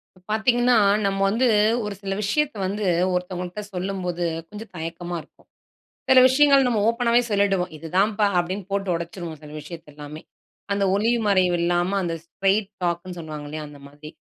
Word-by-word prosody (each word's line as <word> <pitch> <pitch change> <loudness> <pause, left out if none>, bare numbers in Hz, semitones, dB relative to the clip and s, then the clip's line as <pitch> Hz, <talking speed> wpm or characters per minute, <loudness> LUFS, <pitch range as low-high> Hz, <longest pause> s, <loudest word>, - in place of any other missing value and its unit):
இப்ப 185 - -22
பார்த்தீங்கன்னா, 240 +3 +3 0.3
நம்ம 195 0 0
வந்து 240 +5 +2 0.4
ஒரு 210 - -4
சில 195 -1 -3
விஷயத்த 295 +7 0
வந்து 205 +2 -3 0.3
ஒருத்தவங்கள்ட்ட 180 +2 -4
சொல்லும்போது, 180 -2 -3 0.2
கொஞ்சம் 215 +2 -10
தயக்கமா 170 +1 -5
இருக்கும். 155 - -24 0.6
சில 260 - +8
விஷயங்கள் 275 0 +5
நம்ம 235 -3 +1
ஓப்பனாவே 235 +1 +2
சொல்லிவிடுவோம். 195 -4 +1
"இதுதான்ப்பா" 195 +7 +1
அப்பிடின்னு 185 +2 -2
போட்டு 200 -1 -1
உடச்சிருவோம், 170 -1 -6
சில 150 -1 -11
விஷயத்த 165 0 -10
எல்லாமே. 150 +1 -9 0.5
அந்த 200 0 0
ஒளிவு 230 +4 +2
மறைவு 185 -3 +3
இல்லாம 175 +3 +1
அந்த 170 -1 -2
ஸ்ட்ரெய்ட் 195 +3 0
டாக்ன்னு 175 +1 -2
சொல்லுவாங்க 155 -2 -7
இல்லயா? 155 +1 -5
அந்த 145 -1 -13
மாதிரி. 145 +2 -12
185 Hz, 150 wpm, -23 LUFS, 170-210 Hz, 0.6 s, சில